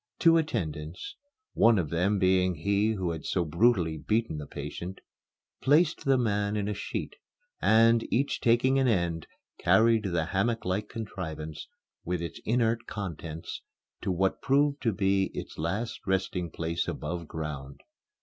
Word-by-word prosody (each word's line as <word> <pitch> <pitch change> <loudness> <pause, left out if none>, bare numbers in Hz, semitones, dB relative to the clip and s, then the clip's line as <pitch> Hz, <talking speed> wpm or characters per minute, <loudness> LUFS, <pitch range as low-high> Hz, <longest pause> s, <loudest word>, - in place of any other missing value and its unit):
Two 165 -1 +5
attendants 90 - -3 0.4
one 115 -1 +5
of 80 -6 -1
them 90 +5 +1
being 95 -1 +3
he 100 +6 +1
who 95 -5 -2
had 80 -3 -5
so 90 -2 0
brutally 85 -2 +2
beaten 105 -3 0
the 75 - -7
patient 90 +2 -6 0.6
placed 155 +4 +3
the 135 -1 +4
man 105 -3 0
in 100 -1 -1
a 105 - -1
sheet - - -5 0.4
and, 115 +1 +4
each 140 +4 0
taking 125 +3 +3
an 135 - +3
end, 85 -7 0 0.3
carried 115 -1 +4
the 85 -4 0
hammocklike 105 -1 0
contrivance, 80 -9 -6 0.4
with 90 0 -2
its 85 0 -6
inert 115 0 +1
contents, 85 -5 -6 0.4
to 95 - -1
what 95 +2 0
proved 140 +1 +2
to 115 - +2
be 95 -1 +2
its - - -7
last 100 +9 -2
resting 95 -2 0
place 85 +1 -2
above 85 -2 -4
ground. 75 -4 -6
95 Hz, 145 wpm, -28 LUFS, 85-115 Hz, 0.6 s, Two